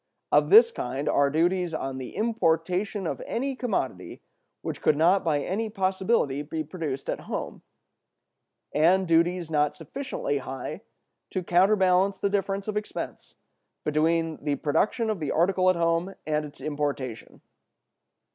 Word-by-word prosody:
Of 150 0 +4
this 230 +4 +8
kind 130 - -4
are 140 0 +3
duties 175 +2 +1
on 135 -3 -4
the 130 - -8
importation 190 -2 0
of - - -3
any 270 +3 -2
commodity 160 - -3 0.4
which - - -5
could 150 - +3
not 175 +5 +4
by 150 -3 +1
any 215 +8 -2
possibility 190 - 0
be 155 +2 -4
produced 150 -4 -5
at - - -2
home, - - -4 1.1
and 180 +5 +3
duties 170 0 +2
not 150 -1 +1
sufficiently 265 - -3
high 130 0 -6 0.5
to 185 - -3
counterbalance 190 +1 +3
the 200 +1 -1
difference 195 0 -1
of 210 -1 -2
expense 210 - -6 0.5
between 160 +1 0
the 145 -1 0
production 215 - 0
of 210 - -3
the 150 - -3
article 185 +2 +3
at 185 - +3
home 170 +3 0
and 150 0 0
its 145 - -12
importation. 145 -6 -4
170 Hz, 140 wpm, -26 LUFS, 150-195 Hz, 1.1 s, this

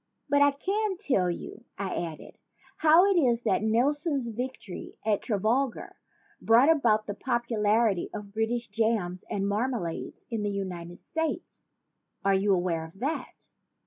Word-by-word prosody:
"But 285 0 +3
I 285 - +7
can 390 +7 -1
tell 255 - +1
you," 175 +6 -6
I 195 -1 -3
added, 165 -3 -6 0.4
"how 320 +4 +6
it 395 -1 +3
is 245 -8 +3
that - - +2
Nelson's 270 +4 +1
victory 240 -4 -6
at 210 -2 +2
Trafalgar 225 +4 -1 0.5
brought 245 +7 +6
about 225 -9 +3
the 205 - -4
popularity 225 -4 +1
of 205 -1 -8
British 230 +2 -1
jams 205 -4 0
and 200 0 -1
marmalades 210 -5 -3
in 225 -2 -1
the 205 - -1
United 180 -3 -5
States. 320 0 -4 0.6
Are 195 - +4
you 195 +1 +2
aware 175 -3 +1
of 160 +3 -12
that?" 290 +7 -4
225 Hz, 145 wpm, -28 LUFS, 200-270 Hz, 0.6 s, I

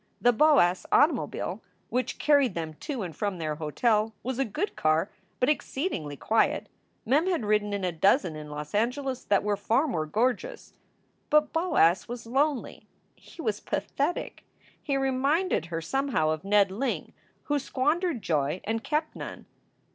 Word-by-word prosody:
The 245 - +4
Boas 220 - +4
automobile, 300 +3 +2 0.3
which 250 +1 -1
carried 285 -8 +3
them 160 -2 -4
to 270 -8 -4
and 170 -4 -6
from 200 0 -2
their 155 -2 -3
hotel, 215 +8 +1
was 260 +1 -3
a 270 - +2
good 310 - -3
car, 155 +4 +1 0.3
but 250 - +2
exceedingly 265 - -2
quiet. 225 +10 +1 0.4
Mem 295 +9 +3
had 340 - 0
ridden 210 0 +1
in 200 -1 -2
a 180 - 0
dozen 175 - +2
in 150 -1 -8
Los 150 0 -7
Angeles 255 +4 -1
that 200 0 +2
were 205 0 +1
far 225 +8 +1
more 155 - -2
gorgeous. 250 - -1 0.6
But 300 0 +3
Boas 320 - +3
was 240 0 -7
lonely. 275 +3 -1 0.3
He - - -12
was - - -1
pathetic. 295 +6 -3 0.4
He 275 -3 -1
reminded 270 - +1
her 165 -1 -3
somehow 235 - 0
of 155 -1 -3
Ned 200 -1 +3
Ling, 255 +8 -3 0.3
who 290 0 0
squandered 295 - 0
joy 150 -1 0
and 225 +1 -2
kept 310 +1 -1
none. - - -8
230 Hz, 155 wpm, -27 LUFS, 180-285 Hz, 0.6 s, The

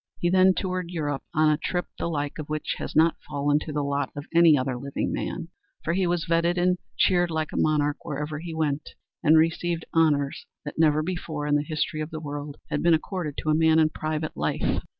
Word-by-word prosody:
He 175 - 0
then 185 0 +5
toured 185 -2 -2
Europe 145 -5 -2
on 155 -2 +3
a 150 - +1
trip 175 +2 -1
the - - -1
like 145 -1 -3
of 150 - -6
which 155 0 -2
has - - -5
not 160 +2 +4
fallen 145 +1 +1
to 155 - -6
the 145 -1 -1
lot 140 0 -1
of 145 0 -6
any 165 -3 +7
other 130 -1 -1
living 140 +3 -3
man, - - -4 0.3
for 170 - 0
he 185 0 +1
was 175 -1 0
feted 170 +1 +2
and 180 0 +2 0.2
cheered 175 -2 +3
like 160 -1 -2
a - - -7
monarch 150 -1 +2
wherever 150 0 -4
he 165 0 -6
went, 150 -2 -2 0.3
and 155 +2 +6
received 165 +1 +1
honors 145 -4 +2 0.2
that 145 - -6
never 155 -1 +4
before 160 -4 -4
in 145 - +1
the 145 - +4
history 155 0 -2
of 155 - -4
the 155 - -6
world 145 -1 -6
had 150 - 0
been 170 -1 +5
accorded 160 -2 -4
to 155 - +1
a - - +4
man 160 0 +4
in 155 -1 +5
private 155 0 -3
life. - - 0
155 Hz, 220 wpm, -26 LUFS, 145-170 Hz, 0.3 s, any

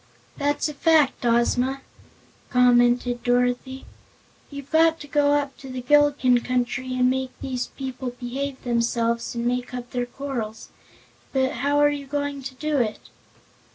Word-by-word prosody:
"That's 290 +1 0
a 300 - -5
fact, 310 -3 +3
Ozma," 250 +3 +1 0.7
commented 245 -1 +3
Dorothy. 245 +2 0 0.6
"You've 280 -1 -9
got 325 0 +4
to 290 - -9
go 290 0 +2
up 285 -2 0
to 270 - -11
the 255 -1 -6
Gillikin 285 -2 +4
Country 255 +1 -1
and 250 0 +3
make 260 0 -2
these 255 -2 -3
people 260 -1 -6
behave 265 +2 -4
themselves 235 -1 0
and 235 0 -2
make 250 +1 -2
up 245 -1 -7
their 245 -1 -2
quarrels. 245 -5 -5 0.6
But 265 0 +2
how 285 +4 0
are 290 0 +5
you 285 -1 -5
going 285 0 -3
to 260 0 -7
do 300 +1 -1
it?" 220 -3 -2
260 Hz, 150 wpm, -24 LUFS, 245-280 Hz, 0.7 s, are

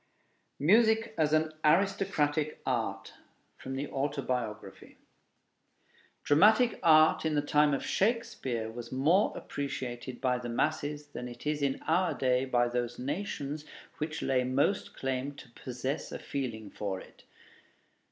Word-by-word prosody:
MUSIC 220 +7 +4
AS 155 -2 +2
AN 155 0 +2
ARISTOCRATIC 155 -3 +1
ART 110 -7 -2 0.4
From 135 0 -6
the 140 +2 -3
Autobiography 125 -8 -3 1.3
Dramatic 215 +10 +5
art 155 -1 +6
in 160 -1 0
the 145 - +3
time 150 0 +3
of - - -4
Shakespeare 135 - -1
was 120 +1 -8
more 160 +10 +3
appreciated 130 -3 -5
by 125 -2 +1
the 120 -1 -6
masses 150 +3 -1
than 125 - -6
it 120 +2 -10
is 150 0 -1
in 140 -1 -1
our 180 +3 +1
day 130 0 +1
by 120 -2 +2
those 120 0 -2
nations 145 0 -4 0.4
which 155 0 -3
lay 130 -1 +2
most 135 +10 0
claim 135 +1 -2
to 125 -4 -13
possess 130 +4 -4
a - - -4
feeling 115 -7 -5
for 100 -3 -3
it. - - -16
140 Hz, 130 wpm, -30 LUFS, 125-155 Hz, 1.3 s, art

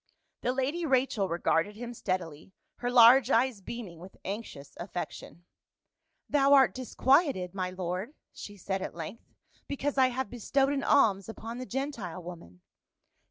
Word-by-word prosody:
The 250 - 0
lady 270 +7 -1
Rachel 255 - +1
regarded 170 +3 0
him 240 +2 -7
steadily, 185 -5 -4 0.2
her 245 - -2
large 245 +1 +7
eyes 240 -4 +2
beaming 195 -6 -8
with 185 +3 -13
anxious 195 -8 -6
affection. 175 -1 -7 0.4
" - - -52
Thou 280 -1 +4
art 270 -2 +6
dis 255 -1 -8
quieted, 265 - +3
my 185 -2 -2
lord," 185 - -4 0.2
she 205 -1 -9
said 190 +1 -3
at - - -5
length, 170 +7 -8 0.2
" - - -36
because 280 0 -2
I 260 - +6
have 255 +1 -3
bestowed 270 +4 +1
an 275 - -1
alms 205 -8 +3
upon 225 +2 -7
the 255 - -6
Gentile 235 - -4
woman." 125 - -11
230 Hz, 160 wpm, -29 LUFS, 185-265 Hz, 0.4 s, large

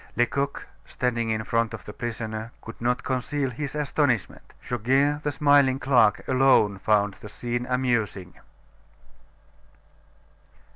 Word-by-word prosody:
Lecoq, 140 +4 -1 0.2
standing 120 -2 -2
in 110 0 -1
front 115 0 0
of - - -13
the 105 - -8
prisoner, 110 -1 -5
could 115 - -10
not 125 +1 0
conceal 130 +1 -2
his 140 +4 -5
astonishment. 145 -6 -1
Goguet, 135 +5 +1
the 150 - -1
smiling 145 -2 +4
clerk, 125 -6 +3
alone 130 -7 +3
found 105 0 +2
the 105 - -10
scene 120 +3 -4
amusing. 120 -8 -1
120 Hz, 115 wpm, -25 LUFS, 110-135 Hz, 0.2 s, smiling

